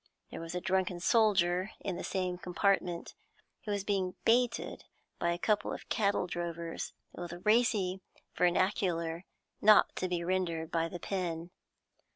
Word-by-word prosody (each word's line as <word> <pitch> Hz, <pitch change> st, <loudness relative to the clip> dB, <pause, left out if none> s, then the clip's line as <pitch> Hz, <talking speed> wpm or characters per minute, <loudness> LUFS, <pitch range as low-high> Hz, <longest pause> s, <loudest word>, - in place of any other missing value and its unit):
There -, -, -6 dB
was 165 Hz, +1 st, -6 dB
a 180 Hz, -, -2 dB
drunken 185 Hz, -1 st, 0 dB
soldier 185 Hz, -2 st, +3 dB
in 190 Hz, -, -3 dB
the -, -, -5 dB
same 180 Hz, -2 st, -2 dB
compartment, 180 Hz, -1 st, 0 dB, 0.5 s
who 210 Hz, -, -2 dB
was 200 Hz, -1 st, -1 dB
being 195 Hz, -3 st, -1 dB
baited 235 Hz, 0 st, +2 dB, 0.3 s
by 170 Hz, -, +1 dB
a 170 Hz, -, -1 dB
couple 210 Hz, +3 st, +1 dB
of -, -, -7 dB
cattle 200 Hz, -3 st, +1 dB
drovers 170 Hz, -1 st, -4 dB, 0.2 s
with 175 Hz, +1 st, -8 dB
racy 210 Hz, -4 st, +3 dB, 0.3 s
vernacular 175 Hz, -2 st, +1 dB, 0.4 s
not 215 Hz, 0 st, +6 dB
to 185 Hz, -, 0 dB
be 175 Hz, -1 st, -1 dB
rendered 170 Hz, -3 st, -1 dB
by 165 Hz, 0 st, +1 dB
the 175 Hz, +1 st, -7 dB
pen. 175 Hz, -3 st, -3 dB
180 Hz, 145 wpm, -32 LUFS, 170-200 Hz, 0.5 s, not